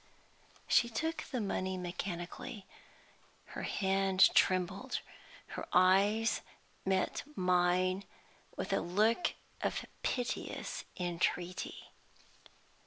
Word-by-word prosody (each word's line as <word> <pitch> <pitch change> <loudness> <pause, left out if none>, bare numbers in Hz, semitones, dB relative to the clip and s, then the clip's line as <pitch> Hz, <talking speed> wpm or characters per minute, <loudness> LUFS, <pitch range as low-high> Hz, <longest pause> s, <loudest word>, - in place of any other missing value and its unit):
She 235 - +4
took 320 +8 -2
the 255 - -3
money 190 -3 -1
mechanically. 180 +5 -5 0.8
Her - - -6
hand 190 -1 +3
trembled; 185 +7 +2 0.5
her - - -5
eyes 200 +4 +4 0.4
met 190 -1 +1
mine 185 +1 +2 0.5
with 195 - -2
a - - +2
look 215 - +2 0.3
of - - -1 0.2
piteous 245 -2 -2
entreaty. 175 0 -2
190 Hz, 85 wpm, -34 LUFS, 180-210 Hz, 0.8 s, She